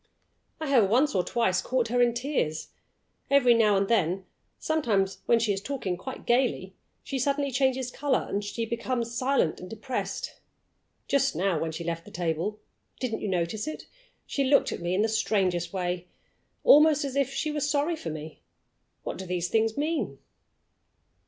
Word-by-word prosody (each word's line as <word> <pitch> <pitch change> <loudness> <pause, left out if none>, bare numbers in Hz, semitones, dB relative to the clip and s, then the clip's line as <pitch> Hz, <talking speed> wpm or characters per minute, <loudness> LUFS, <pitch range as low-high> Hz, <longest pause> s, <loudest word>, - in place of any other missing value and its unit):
"I 315 - -3
have 245 -9 +4
once 275 +7 +3
or 180 - +2
twice 190 -5 +1
caught 245 0 0
her 245 +1 +2
in 240 -1 +3
tears. 240 - -2 0.6
Every 270 -3 +6
now 215 -3 +4
and 195 0 +1
then 190 -4 +1 0.3
sometimes 220 -12 0
when 235 - +5
she 220 -3 +1
is 195 - -4
talking 210 -6 -3
quite 260 +8 -8
gayly 240 -6 +1 0.3
she 270 - -3
suddenly 280 +1 0
changes 260 -1 +1
color 275 -1 0
and 205 - -2 0.2
becomes 235 0 -2
silent 255 - +1
and 180 - -9
depressed. 225 +5 -4 0.7
Just 275 -1 +2
now, 185 -3 +1
when 160 0 -2
she 165 +2 -5
left 165 0 -3
the - - -11
table 175 +5 -2 0.4
(didn't 235 -4 -2
you - - -2
notice 185 - -1
it?), 310 - -6 0.4
she 280 - -1
looked 280 +2 +4
at - - -5
me 175 +1 -1
in 205 - +2
the - - +2
strangest 185 -6 0
way 180 -1 -3 0.6
almost 300 -1 +6
as 275 -1 -4
if 275 -1 +1
she 305 - -2
was 295 -1 -1
sorry 295 +3 +1
for 175 - -6
me. 155 0 -8 0.6
What - - -5
do 190 - -6
these 175 -1 -1
things 220 0 +1
mean?" 310 +3 -1
230 Hz, 170 wpm, -27 LUFS, 185-270 Hz, 0.7 s, Every